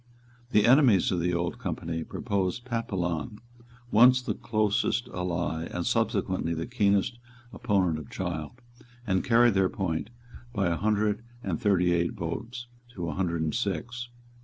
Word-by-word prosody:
The 105 -2 +4
enemies 120 - +5
of 90 - 0
the 90 +1 0
Old 85 +7 -2
Company 85 -6 -3
proposed 100 +3 -2
Papillon, 95 - -2 0.5
once 125 +3 +7
the 125 - -2
closest 110 +2 0
ally 85 -4 -2
and 90 0 -4
subsequently 105 -7 0
the 80 - -3
keenest 105 -1 +1 0.3
opponent 90 -6 +1
of 75 - -10
Child, 80 -5 -4 0.5
and 95 -3 +1
carried 120 -1 +5
their 95 -1 +3
point 90 0 -2 0.4
by 100 -5 +1
a 85 - +1
hundred 105 +3 +1 0.2
and - - -2
thirty 95 -5 +3
eight 85 0 +1
votes 120 +9 -5 0.3
to 85 -4 -3
a - - -3
hundred 85 -3 -1
and 80 - -1
six. 120 +3 -3
95 Hz, 145 wpm, -28 LUFS, 85-115 Hz, 0.5 s, once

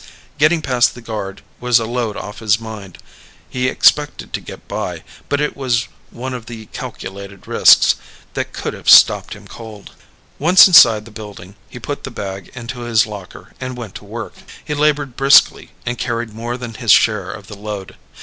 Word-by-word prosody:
Getting 155 +2 +3
past 125 -3 +2
the - - -10
guard 105 -4 -6 0.2
was 125 -1 +3
a 115 - -3
load 115 -2 -3
off 105 - -8
his 110 -1 +2
mind. 110 -5 -9 0.5
He'd 130 0 0
expected 150 +2 +2
to - - -3
get - - -12
by, - - -5 0.3
but 145 - 0
it 150 - -1
was 130 -3 -1 0.2
one 130 +2 -6
of 120 -2 -7
the 115 -2 -9
calculated 100 0 -8
risks - - +5 0.4
that - - -4
could - - -5
have - - -3
stopped - - +6
him - - -15
cold. 110 -3 -11 0.5
Once 175 +5 +7
inside 115 - +7
the 115 - -13
building, 105 -3 -10 0.2
he - - -11
put 140 +4 -6
the - - -5
bag 95 -2 -7
into 125 0 -7
his 120 -2 +2
locker 105 -4 -11
and 130 -1 -5
went 115 -6 -8
to - - -10
work. - - -7 0.3
He 150 - -3
labored 145 -3 0
briskly 135 0 +4 0.2
and 120 0 -3
carried 115 -1 -3
more 120 +3 -5
than 120 -2 -7
his 115 -1 0
share 100 -4 +3
of 100 -1 -10
the 105 - -10
load. 100 -2 -7
115 Hz, 185 wpm, -18 LUFS, 105-130 Hz, 0.5 s, Once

